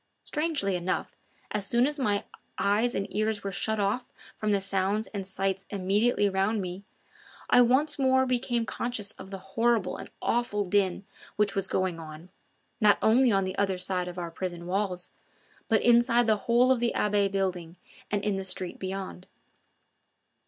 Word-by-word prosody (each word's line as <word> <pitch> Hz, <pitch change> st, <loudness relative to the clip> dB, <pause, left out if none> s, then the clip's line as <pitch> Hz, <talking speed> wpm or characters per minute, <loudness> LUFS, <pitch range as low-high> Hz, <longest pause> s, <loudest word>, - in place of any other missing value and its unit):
Strangely 300 Hz, -, 0 dB
enough, 180 Hz, +1 st, -2 dB, 0.4 s
as 205 Hz, -1 st, 0 dB
soon 240 Hz, +1 st, +4 dB
as 295 Hz, +1 st, -2 dB
my 205 Hz, -6 st, +1 dB, 0.3 s
eyes 215 Hz, +5 st, +1 dB
and 195 Hz, -, -1 dB
ears 215 Hz, 0 st, 0 dB
were 200 Hz, -, -3 dB
shut 220 Hz, +3 st, -1 dB
off 205 Hz, +5 st, 0 dB, 0.3 s
from 215 Hz, -1 st, -1 dB
the 200 Hz, -, +3 dB
sounds 195 Hz, +2 st, 0 dB
and 195 Hz, -2 st, -4 dB
sights 195 Hz, 0 st, -2 dB
immediately 205 Hz, +3 st, +2 dB
round 195 Hz, +3 st, +1 dB
me, 185 Hz, 0 st, -5 dB, 0.7 s
I 245 Hz, -, +7 dB
once 280 Hz, +5 st, +2 dB
more 260 Hz, -1 st, +4 dB
became 245 Hz, -2 st, 0 dB
conscious 220 Hz, -3 st, -2 dB
of 190 Hz, -, -9 dB
the 195 Hz, -, -6 dB
horrible 195 Hz, +1 st, 0 dB
and -, -, -9 dB
awful 230 Hz, -4 st, 0 dB
din 195 Hz, 0 st, +1 dB, 0.3 s
which 210 Hz, -1 st, +1 dB
was 195 Hz, -1 st, 0 dB
going 185 Hz, -3 st, -1 dB
on, 160 Hz, +2 st, -10 dB, 0.5 s
not 210 Hz, -3 st, +5 dB
only 240 Hz, +3 st, +5 dB
on 195 Hz, -1 st, +2 dB
the 185 Hz, 0 st, -3 dB
other 195 Hz, -2 st, +1 dB
side 180 Hz, 0 st, -1 dB
of 180 Hz, 0 st, -7 dB
our 170 Hz, -1 st, -4 dB
prison 175 Hz, 0 st, -5 dB
walls, 185 Hz, -1 st, -2 dB, 0.6 s
but 220 Hz, -2 st, +2 dB
inside 240 Hz, 0 st, +4 dB
the 220 Hz, -1 st, +3 dB
whole 245 Hz, +2 st, +5 dB
of 260 Hz, -, +3 dB
the 235 Hz, 0 st, 0 dB
Abbaye 205 Hz, -1 st, +2 dB
building 180 Hz, -3 st, -2 dB, 0.3 s
and 205 Hz, -1 st, -1 dB
in 205 Hz, -2 st, 0 dB
the 195 Hz, -, -3 dB
street 185 Hz, -1 st, -3 dB
beyond. 190 Hz, -1 st, -5 dB
200 Hz, 170 wpm, -28 LUFS, 190-235 Hz, 0.7 s, I